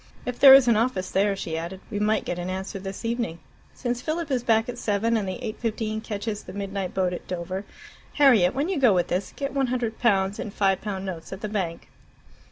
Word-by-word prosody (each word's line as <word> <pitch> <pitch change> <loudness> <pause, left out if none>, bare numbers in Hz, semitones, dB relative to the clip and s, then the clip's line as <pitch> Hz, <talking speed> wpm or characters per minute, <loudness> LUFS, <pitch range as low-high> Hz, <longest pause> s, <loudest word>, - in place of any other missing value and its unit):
"If 250 -1 -4
there 270 -1 +11
is 270 -2 +6
an 235 - +5
office 220 -5 0
there," 200 +1 +2
she 170 -4 -4
added, 170 +3 -5
"we 205 - -2
might 215 +1 +1
get 175 - -3
an 175 +1 -4
answer 190 +2 -4
this 195 +3 -7
evening. 230 -7 -2 0.4
Since 245 -1 -2
Philip 315 0 -3
is 255 -2 +1
back 225 -1 +2
at 245 0 -6
seven, 220 +2 +1
and 210 -3 0
the 185 - -4
eight 215 - -5
fifteen 220 -1 -2
catches 210 -1 -4
the - - -10
midnight 195 -2 -4
boat 185 -1 +1
at - - -7
Dover 185 +2 -4 0.5
Harriet, 245 -11 +5
when 280 +4 0
you 375 -5 -1
go 245 -7 +5
with 175 - +1
this, 185 +2 -1
get 280 -1 -3
100 250 -4 -1
pounds 200 -4 +2
in - - -4
5 195 -1 +1
pound 195 -3 -4
notes 175 -4 -6
at 190 +1 -7
the 215 - -2
bank." 185 -6 -3
210 Hz, 225 wpm, -25 LUFS, 190-240 Hz, 0.5 s, there